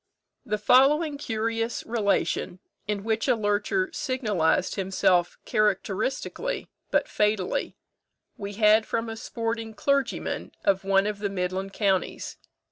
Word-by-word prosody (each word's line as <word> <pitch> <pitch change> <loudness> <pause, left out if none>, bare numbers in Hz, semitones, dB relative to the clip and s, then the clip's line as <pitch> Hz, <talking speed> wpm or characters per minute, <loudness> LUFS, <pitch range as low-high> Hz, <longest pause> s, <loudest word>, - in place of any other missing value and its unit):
The 210 - -1
following 280 +7 +4
curious 225 -1 -2
relation, 210 -5 0 0.3
in 205 -1 -2
which 225 +2 0
a 250 - +4
lurcher 215 - 0
signalised 210 - 0
himself 185 -2 +1
characteristically 215 - -1 0.2
but - - +2
fatally, 210 -3 0 0.6
we 200 0 -6
had 215 +1 +4
from 230 0 -2
a 225 - -5
sporting 225 -1 -4
clergyman 275 +3 -1
of 195 -1 +2
one 195 0 +3
of 210 -1 -2
the 205 -1 -1
midland 190 +1 -3
counties. 195 -4 -1
215 Hz, 120 wpm, -26 LUFS, 195-230 Hz, 0.6 s, following